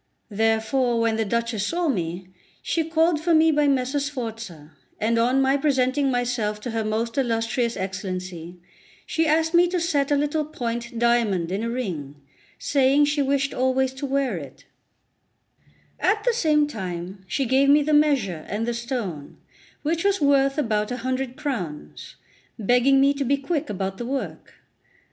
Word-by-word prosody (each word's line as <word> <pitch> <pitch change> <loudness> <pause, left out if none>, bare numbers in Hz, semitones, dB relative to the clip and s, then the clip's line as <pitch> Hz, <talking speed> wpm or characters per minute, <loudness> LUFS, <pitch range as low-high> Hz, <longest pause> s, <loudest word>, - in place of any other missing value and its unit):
Therefore, 225 +3 +1
when 230 -1 +1
the 225 - +1
Duchess 230 -1 -1
saw 345 0 -1
me, 180 - -2 0.4
she 330 - 0
called 325 0 +2
for 335 0 +3
me 320 +1 +5
by 295 -1 +2
Messer 270 +1 +1
Sforza; 225 - -6 0.3
and 230 +2 +1
on 250 +3 +3
my 270 +1 +3
presenting 275 -1 +1
myself 245 -4 -1
to 240 - -5
her 225 0 -1
most 225 +5 -1
illustrious 230 -1 0
Excellency, 185 -2 -5 0.5
she 325 0 0
asked 320 +2 +2
me 345 +1 +5
to 355 0 -1
set 290 -5 0
a 290 - +3
little 295 +2 0
point 235 -4 -5
diamond 225 -8 +1
in 195 +3 -1
a 230 - -2
ring, 175 - -4 0.4
saying 280 +1 +3
she 290 0 0
wished 275 0 0
always 260 +1 +1
to 265 +1 -5
wear 270 -6 0
it; 145 -4 -10 1.3
at 425 -1 +1
the - - +2
same 305 -9 +3
time 190 -6 -6
she 270 +8 -1
gave 265 +3 +3
me 295 +1 +6
the 305 +1 0
measure 265 - +2
and 220 +3 -2
the 240 - 0
stone, 235 - -5 0.5
which 330 +2 -1
was 400 0 +2
worth 275 -1 +3
about 215 -7 0
a 245 - -3
hundred 260 0 -2
crowns, 180 - -5 0.4
begging 245 +5 +3
me 275 +1 +4
to 280 0 -2
be 280 +2 +1
quick 285 0 -3
about 195 -1 -4
the 240 - -4
work. 270 +1 -5
255 Hz, 165 wpm, -24 LUFS, 215-285 Hz, 1.3 s, me